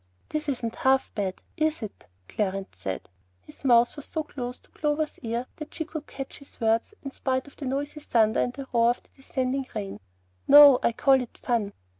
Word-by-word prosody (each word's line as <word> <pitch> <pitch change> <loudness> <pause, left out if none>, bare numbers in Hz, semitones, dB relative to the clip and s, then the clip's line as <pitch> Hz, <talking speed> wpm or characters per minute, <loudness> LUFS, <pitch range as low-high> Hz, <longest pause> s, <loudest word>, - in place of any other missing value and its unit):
"This 305 -1 -2
isn't 235 -4 -3
half 265 -4 +2
bad, 195 -3 -2 0.2
is 310 -4 0
it?" 210 - -9 0.2
Clarence 195 - -2
said. 95 0 -4 0.4
His - - -14
mouth 240 -2 +5
was 290 - -7
so 315 - -3
close 250 -4 -6
to - - -25
Clover's 300 0 -1
ear 235 +1 -2
that 305 -2 -8
she 320 - -2
could 310 -1 -7
catch 270 -1 -7
his 280 - -15
words 225 - +1
in 275 - -5
spite 260 -1 -1
of 285 - -15
the 280 - -7
noisy 285 +3 -2
thunder 225 -6 +2
and 245 - +1
the 270 +2 -7
roar 235 0 +5
of 240 - -1
the - - -27
descending 265 0 -2
rain. 200 -2 -4 0.5
"No; 285 -2 +10
I - - +3
call 265 +2 +4
it 245 - -8
fun." 225 -5 -1
260 Hz, 200 wpm, -27 LUFS, 230-290 Hz, 0.5 s, No